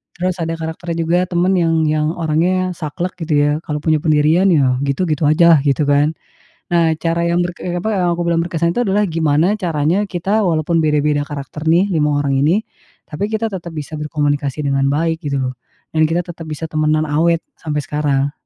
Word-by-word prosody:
Terus 180 0 -1
ada 165 0 -2
karakter 165 +1 -5
juga 170 +2 +1
teman 180 +2 +1
yang 165 -1 +2
yang 150 0 +1
orangnya 175 +3 0
saklek 170 +3 -4
gitu 160 -1 -2
ya, 145 0 +3 0.2
kalau 150 -1 -2
punya 155 -2 +2
pendirian 155 +4 +3
ya 130 -6 +2
gitu, 140 +6 0
gitu 155 -1 -1
aja 170 +2 +6
lah - - +3
gitu 145 +1 +1
kan. 145 +2 +3 0.6
Nah, 165 -2 +3
cara 170 0 0
yang 170 +1 +1
berke 175 +1 -5
apa 215 - -2
yang 175 -2 +1
aku 175 - -2
bilang 170 -1 +2
berkesan 170 0 -1
itu - - 0
adalah 205 +1 +2
gimana 165 +4 +1
caranya 170 +1 0
kita 190 +4 -1
walaupun 165 -1 +1
beda-beda 150 -1 +1
karakter 145 +2 -6
nih 175 +5 +4
5 150 -3 +1
orang 135 -1 +1
ini, 185 +8 +2 0.4
tapi 175 +7 -3
kita 220 +1 -1
tetap 175 -3 -6
bisa 155 +1 -6
berkomunikasi 145 -1 -1
dengan 135 0 +1
baik 160 +3 0
gitu 140 -1 -1
lho, 130 - -2 0.4
dan 160 0 +2
kita 165 +2 0
tetap 170 -1 -8
bisa 155 +1 -5
temenan 155 0 +1
awet 165 +3 +1 0.2
sampai 150 -2 -2
sekarang. 145 -2 0
160 Hz, 190 wpm, -18 LUFS, 150-175 Hz, 0.6 s, aja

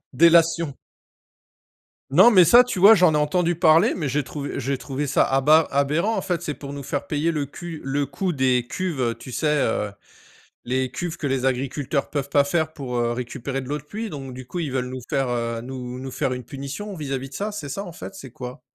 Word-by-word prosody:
Délation! 165 -2 +4 1.4
Non 240 - +7
mais 185 -6 +7
ça 240 +8 +7
tu 245 - -4
vois, 205 +4 +9
j'en 180 -6 +4
ai - - +3
entendu 170 +4 +1
parler, 165 +5 +5
mais 155 -5 -2
j'ai 145 +3 0
trouvé 140 +3 -5
j'ai 135 +2 -1
trouvé 140 +2 -4
ça - - +3
aba 150 +4 +4
aberrant. 150 +10 +1
En - - 0
fait 175 -4 -2
c'est 150 - -2
pour 140 -1 -8
nous 140 - -6
faire 140 +1 -3
payer 150 +2 0
le 150 -3 -2
cu 165 +3 -8
le 140 +1 -1
coût 175 +7 -2
des 130 -3 +2
cuves, 175 -1 -3
heu, 120 -2 +1
tu 120 +2 -11
sais, 155 - -1 0.2
heu, 105 -2 0 0.8
les 130 +1 0
cuves 165 +6 -5
que 145 - -3
les 135 -1 -1
agriculteurs 135 +2 -1
peuvent 140 -2 -3
pas 145 - +5
faire 160 +2 -1
pour, 130 -5 -4
heu, 120 0 +1
récupérer 125 +2 -4
de 130 - -9
l'eau 145 - -1
de 140 - -12
pluie. 215 +9 -5
Donc 135 -5 -7
du 130 0 -9
coup 180 - -6
ils 155 -5 -2
veulent 125 -1 -2
nous 130 0 -6
faire, 135 -2 0
heu, 115 -1 -2
nous 125 0 -7
nous 130 0 -6
faire 130 - -1
une 125 0 -6
punition 140 - -6
vis-à-vis 135 -4 -4
de - - -11
ça, 210 +2 -2
c'est 155 -9 -6
ça 195 +9 -4
en 175 - -8
fait? 195 - -9
C'est 130 -10 -10
quoi? 125 +1 -8
140 Hz, 230 wpm, -23 LUFS, 130-165 Hz, 1.4 s, vois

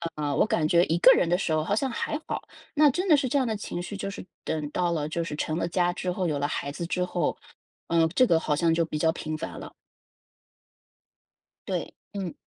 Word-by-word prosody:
呃， 145 -2 -1
我 - - +4
感 160 -6 +1
觉 170 +2 +5
一 165 - +1
个 175 - +8
人 165 - +2
的 175 - +3
时 165 - -1
候 155 0 +1
好 200 +6 0
像 265 +5 0
还 295 +5 -2
好。 - - -4 0.3
那 300 -1 +6
真 360 +8 -1
的 320 - +7
是 275 -2 0
这 280 - +2
样 260 - +2
的 220 - -1
情 190 -4 -5
绪 205 - -6
就 195 - -3
是 200 - -8 0.2
等 155 -2 -2
到 175 +1 0
了 150 -3 -1
就 170 +2 -1
是 160 -3 -5
成 155 +1 -2
了 - - 0
家 175 0 +1
之 180 0 -2
后， 185 +1 -2
有 150 -3 -1
了 145 - 0
孩 140 -1 -3
子 170 +4 -5
之 180 0 0
后， 175 -3 -1 0.5
呃， 165 -1 +3
这 255 - +6
个 165 -5 +4
好 150 -2 0
像 165 +2 +2
就 165 +1 +2
比 155 - -4
较 160 +1 +3
频 155 -2 -4
繁 165 - -6
了。 - - -9 2.0
对， - - -2 0.2
嗯。 190 -4 -4
170 Hz, 260 characters per minute, -27 LUFS, 155-195 Hz, 2.0 s, 个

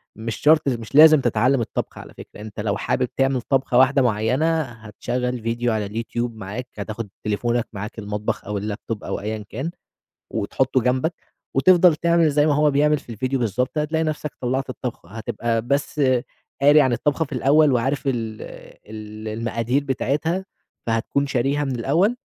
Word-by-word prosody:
مش 115 0 -4
شرط، 155 0 +4
مش 120 -1 -3
لازم 155 -1 +8
تتعلم 125 +2 +2
الطبخ 115 - -4
على - - -11
فكرة، - - -12
أنت 105 -1 -9
لو 105 -1 -1
حابب 125 - 0
تعمل 135 -1 +2
طبخة 130 -1 +1
واحدة 135 +2 +5
معيَّنة، 130 +8 +1
هتشغل 125 0 -4
Video 115 +1 -1
على 110 -3 -1
الYouTube 115 +2 -3
معاك، 110 +3 -7
هتاخد 110 +1 -5
تليفونك 120 +3 0
معاك 105 +3 -6
المطبخ، 105 0 -3
أو 105 0 -3
الLaptop 105 +2 -4
أو - - -3
أيًا 105 0 -4
كان 135 +9 -4 0.6
وتحطه 130 +5 0
جنبك 130 +7 0 0.4
وتفضل 175 +4 +6
تعمل 170 -1 +3
زي 145 +1 +3
ما 150 - +3
هو 150 +1 +3
بيعمل 150 +2 +3
في 120 -5 -10
الVideo 130 +5 -2
بالضبط، 125 +4 -1
هتلاقي 155 +2 0
نفْسَك 155 -1 -3
طلّعت 130 +1 -1
الطبخة، 125 -8 -6
هتبقى 115 +2 -2
بس 140 +4 -1 0.6
قاري 145 +2 +7
عن 130 -4 +3
الطبخة 145 +7 0
في 150 - -14
الأول 140 +3 +4
وعارف 135 +3 0
ال 115 -5 -2 0.5
ال 110 0 -8
المقادير 115 +4 -1
بتاعتها، 150 +7 -1 0.4
فهتكون 115 +5 0
شاريها 135 +2 0
من 135 -2 -2
الأول، 170 - +2
125 Hz, 160 wpm, -22 LUFS, 110-145 Hz, 0.6 s, لازم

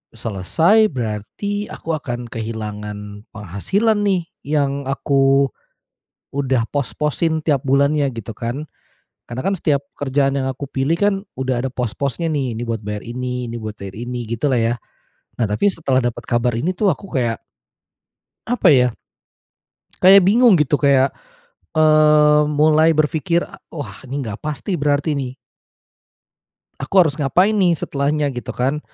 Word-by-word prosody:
selesai, 160 - +2
berarti 130 - -4
aku 165 - -6
akan 120 -4 -5
kehilangan 105 -2 -6
penghasilan 150 - 0
nih 190 -3 +1 0.2
yang 140 -2 0
aku 135 0 +2 0.9
udah 130 -4 +1
pos-posin 150 +5 -1
tiap 145 -4 +2
bulannya," 140 +2 +2
gitu 115 -1 -6
kan. 120 +6 -4 0.6
Karena 120 +2 -5
kan 195 - +2
setiap 145 -4 +1 0.2
kerjaan 140 0 +1
yang 130 - -1
aku 140 +2 -6
pilih 135 +5 0
kan, 205 +1 +3 0.2
udah 130 -2 -1
ada 135 - -1
pos-posnya 135 +7 -2
ni, 135 -6 -1
ini 115 - -4
buat 115 -1 -2
bayar 105 0 -4
ini, 125 0 -4
ini 120 - -5
buat 110 -1 -6
bayar 100 0 -8
ini, 120 +1 -4
gitulah 125 +4 0
ya. 115 +1 +1 0.7
Nah, 115 - +3
tapi 110 - +2
setelah 135 -7 0
dapat 120 -1 -2
kabar 120 +1 +1
ini 170 +9 0
tuh 200 +1 +2
aku 195 - -9
kayak 120 -4 -1 1.1
apa 235 -6 +3
ya, 125 -3 +5 1.2
kayak 190 +1 +8
bingung 225 -1 +5
gitu 150 -1 +2
kayak, 140 -2 +3 0.6
eee, 150 -1 +5
mulai 155 +2 +4
berpikir, 160 +3 +1
e - - -14 0.2
“Wah 115 -10 -7
ini 135 +2 -3
nggak 105 -1 -6
pasti 150 +6 -4
berarti 145 +1 +1
nih" 135 -3 -3 1.5
"aku 135 +8 -5
harus 150 -1 -2
ngapain 180 +9 +3
nih 185 -5 +3
setelahnya?” 145 0 -1
gitu 120 -3 -6
kan. 135 +4 0
140 Hz, 145 wpm, -20 LUFS, 120-155 Hz, 1.5 s, kayak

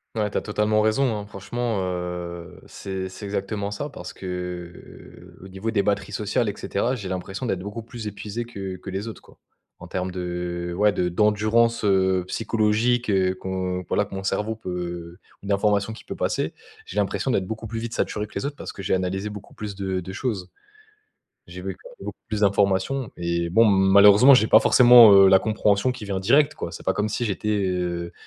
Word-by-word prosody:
Ouais, 105 -2 -1
tu - - -2
as - - 0
totalement 105 0 0
raison, 110 +4 +2
hein. 105 - -6
Franchement, 105 +2 -3
heu, 90 -1 -5
c'est 95 -1 -5
c'est 100 +3 -9
exactement 100 0 -3
ça 105 +9 -5
parce 140 - -9
que, 90 -2 -8
au 95 - -10
niveau 95 +4 -4
des 100 -3 +1
batteries 100 0 -1
sociales 105 +3 0
et 100 - -1
cetera, 120 +6 -1
j'ai 100 -6 -6
l'impression 95 +6 -4
d'être 95 -6 -1
beaucoup 105 +4 -6
plus 115 -1 -8
épuisé 105 +3 -5
que 95 -5 -6
que 95 - -9
les 95 +4 -4
autres, 110 - -10
quoi. - - -20 0.4
En - - -10
terme 95 0 -3
de 90 -1 -4
ouais 105 0 +3
de 90 -1 0
d'endurance, 110 +5 +2
heu, 95 -2 +2
psychologique, 115 +2 +1
heu, 95 -2 +2
qu'on 95 -1 -3
voilà 105 - +1
que 100 - -9
mon 95 - -5
cerveau 105 +3 -1
peut 90 -4 -6 0.3
ou - - -8
d'informations 100 +1 +1
qui 110 - -11
peut - - -6
passer. - - -1 0.3
J'ai - - -10
l'impression 105 +5 -1
d'être 100 -7 +1
beaucoup 110 +2 -6
plus 115 +1 -4
vite 115 0 -5
saturé 105 -3 -2
que - - -18
les - - -3
autres, 145 0 -3
parce - - -7
que - - -9
j'ai 95 - -1
analysé 95 +2 -2
beaucoup 105 -1 -10
plus 105 -2 -7
de 95 -1 -2
de 95 +1 -7
choses. 95 -5 -3 1.0
J'ai - - -9
vu - - -5
clai - - -15
beaucoup - - -7
plus 110 -1 -2
d'informations 100 +6 +1
et 85 0 -1
bon, 115 +7 +5
malheureusement 100 +5 +7
j'ai 110 -3 +3
pas 110 - +7
forcément, 120 -3 +8
heu, 100 -1 +8
la 95 0 +6
compréhension 105 +2 +1
qui 125 -4 -8
vient 95 -2 -3
directe, 140 +9 +4
quoi. - - -6
C'est - - -10
pas - - +2
comme 105 +1 -1
si 120 +3 -2
j'étais, 105 0 -2 0.2
heu, 90 -1 -3
100 Hz, 205 wpm, -24 LUFS, 95-110 Hz, 1.0 s, forcément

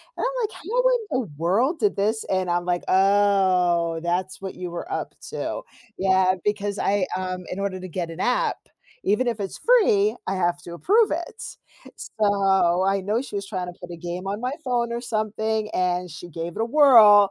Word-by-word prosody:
and - - -2
I'm - - -1
like, 435 - -2
"How 450 +8 -3
in - - +1 0.2
the - - -15
world 230 - +1
did 415 - +1
this?" 215 +3 0
And 185 -1 -1
I'm 175 0 0
like, 175 -1 -1
"Oh, 185 -4 +3
that's 180 +2 -2
what 190 -1 -6
you 180 -1 -6
were 255 - -6
up - - -4
to." - - -4 0.4
Yeah, 190 -1 +3
because 205 -1 -1
I 200 -2 +1
um, 185 -1 -4
in 185 - -4
order 195 -2 -3
to 185 - -7
get 175 -1 -4
an 165 +2 -9
app, 250 +4 +1 0.5
even 210 +5 +2
if 230 -2 -1
it's 195 -2 -5
free, 220 - +4
I 190 - -1
have 175 -1 +1
to 170 - -8
approve 415 - +3
it, 340 +2 -4 0.5
so, 195 -4 +1
I 195 0 +2
know 210 +5 0
she 260 -6 -8
was 200 0 -5
trying 185 -3 -4
to 175 - -7
put 175 - -9
a - - -8
game 175 +3 -5
on 205 +2 -3
my 250 +1 -2
phone, 240 -2 0
or 235 - -2
something, 220 -1 -2
and 180 0 0
she 160 +4 -9
gave 165 +1 -6
it - - -1
a - - +1
whirl. 230 -7 +7
195 Hz, 205 wpm, -24 LUFS, 180-230 Hz, 0.5 s, whirl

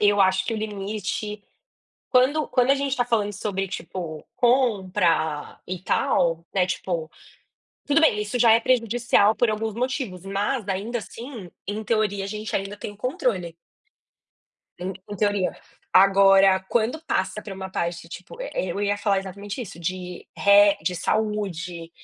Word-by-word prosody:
eu 205 -1 +4
acho 190 0 +3
que 210 - -2
o - - -2
limite 210 0 -4 0.7
quando 275 +5 +3
quando 250 0 +3
a - - +7
gente 275 -1 -1
tá 245 - +2
falando 220 -4 0
sobre, 195 -1 -2
tipo, 170 -5 -6
compra 190 - +1
e 185 0 -4
tal, 165 -3 +1
né, 185 -2 +3
tipo, 170 -3 -3 0.8
tudo 295 +2 +4
bem, 315 -10 +4
isso 210 +4 -2
já 230 -2 +6
é 225 - +5
prejudicial 230 -3 +3
por 225 +1 +2
alguns 215 0 -2
motivos, 245 - -3
mas 200 +4 -1
ainda 205 +5 -2
assim, 230 -4 -9 0.2
em 205 +2 -3
teoria, 210 -3 0
a - - -4
gente 210 +1 -5
ainda 195 +1 -4
tem 205 - -7
controle. 210 -7 -1 1.2
Em 180 +2 -4 0.2
em 205 - -6
teoria. 205 -2 +1 0.4
Agora 195 0 +6
quando 240 +7 0
passa 190 - -1
pra 200 - -7
uma 190 0 -6
parte, 170 -2 -3
tipo, 185 - -10
eh, - - -4 0.2
eu 200 - -3
ia 205 0 +1
falar 200 -1 +1
exatamente 200 +3 -6
isso, 195 -8 -8
de 180 +1 -5
re 200 0 +6
de 180 - -1
saúde, 180 -4 -2
205 Hz, 155 wpm, -24 LUFS, 185-225 Hz, 1.2 s, a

